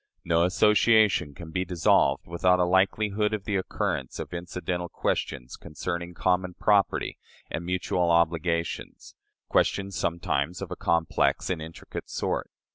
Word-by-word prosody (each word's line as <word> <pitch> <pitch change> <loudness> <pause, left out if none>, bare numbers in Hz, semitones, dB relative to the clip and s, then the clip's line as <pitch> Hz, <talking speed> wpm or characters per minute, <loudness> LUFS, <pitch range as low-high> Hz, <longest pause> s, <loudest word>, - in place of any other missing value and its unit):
No 85 0 +3
association 105 -4 +4
can 80 +1 -9
be 90 +2 0
dissolved 85 -6 +2
without 90 +2 +2
a 90 - +4
likelihood 100 +3 +2
of 105 - -7
the 105 -1 -2
occurrence 95 - -2
of - - -6
incidental 90 0 -4
questions 60 -3 -2
concerning 85 +3 -5
common 90 0 0
property 105 -2 +1 0.3
and 80 - -3
mutual 90 0 0
obligations 85 0 0 0.3
questions 100 -1 +1
sometimes 85 0 -1
of - - -6
a - - -3
complex 85 +2 +1
and 85 -3 -2
intricate 80 +1 -8
sort. - - -2
90 Hz, 130 wpm, -27 LUFS, 85-95 Hz, 0.3 s, association